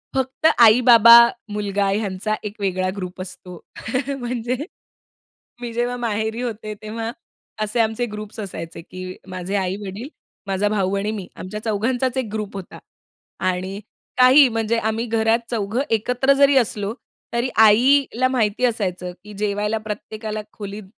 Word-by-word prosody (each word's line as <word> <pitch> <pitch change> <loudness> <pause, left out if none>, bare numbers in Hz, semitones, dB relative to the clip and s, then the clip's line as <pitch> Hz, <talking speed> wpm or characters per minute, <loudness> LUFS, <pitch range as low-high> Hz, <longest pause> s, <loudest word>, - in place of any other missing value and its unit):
फक्त 265 +4 +1 0.2
आई-बाबा, 235 0 +8 0.4
मुलगा 200 -1 -1
ह्यांचा 205 +1 -1
एक 210 -1 -5
वेगळा 185 -1 0
ग्रुप 185 -1 -6
असतो. 180 -1 -9 0.6
म्हणजे, 245 0 -2 1.1
मी 240 -1 -4
जेव्हा 240 +1 -1
माहेरी 220 0 -2
होते, 220 -3 -4
तेव्हा 225 +1 -4 0.5
असे 215 +3 -2
आमचे 220 +2 0
ग्रुप्स 210 0 -8
असायचे, 170 -5 -6
की 185 +1 -8
माझे 185 +1 -4
आई-वडील, 195 +4 -4 0.4
माझा 195 +1 0
भाऊ 200 -2 0
आणि 205 +2 -1
मी 200 -4 -6
आमच्या 190 +3 -6
चौघांचाच 245 +4 0 0.2
1 210 -2 -4
होता. 190 - -9 0.6
आणि 185 +1 -2 0.4
काही 260 +3 +7
म्हणजे 225 0 0
आम्ही 220 +1 -1
घरात 225 0 +2
चौघं 225 +2 -1
एकत्र 250 +5 +2
जरी 280 0 +4
असलो 210 -4 0 0.4
तरी 240 +2 0 0.2
आईला 255 +3 +4
माहिती 245 -2 +1
असायचं, 185 -6 -2
की 210 - -11
जेवायला 210 +1 -1
प्रत्येकाला 215 0 -5
खोलीत 205 0 -7
215 Hz, 130 wpm, -21 LUFS, 200-235 Hz, 1.1 s, आई-बाबा